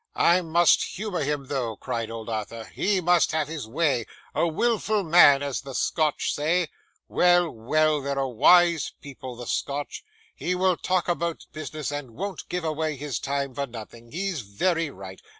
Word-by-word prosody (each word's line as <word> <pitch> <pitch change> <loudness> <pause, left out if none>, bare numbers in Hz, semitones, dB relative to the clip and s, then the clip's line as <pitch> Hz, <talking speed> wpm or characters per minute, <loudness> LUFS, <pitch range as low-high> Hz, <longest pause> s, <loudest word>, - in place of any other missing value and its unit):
'I 175 +2 +4
must 170 0 +4
humour 205 -2 -3
him 145 -1 -2
though,' 130 -5 -2
cried 115 -1 -3
old 115 -1 -7
Arthur; 110 0 -4
'he 200 -1 +1
must 175 -2 +3
have 155 -2 0
his 155 -7 -6
way 135 -2 0 0.3
a 170 - +2
wilful 215 +3 +1
man, 155 -5 +6
as 140 -2 -2
the 135 -1 -8
Scotch 155 -3 0
say 160 +3 +1 0.4
well, 175 -1 +4
well, 150 +6 +1
they're 140 0 -3
a 135 -1 0
wise 170 +6 +4
people, 130 -3 -9
the 120 +1 -8
Scotch. 140 +4 -3 0.3
He 180 - -2
will 185 0 +2
talk 185 +1 0
about 170 -1 -2
business, 155 -3 -5
and 140 -6 -6
won't 195 +4 -5
give 180 -1 -2
away 155 -1 -1
his 140 -4 -4
time 140 -1 -2
for 140 +1 -3
nothing. 115 0 -11
He's 185 -3 -2
very 165 - 0
right. 95 -6 -10
150 Hz, 170 wpm, -25 LUFS, 130-175 Hz, 0.4 s, man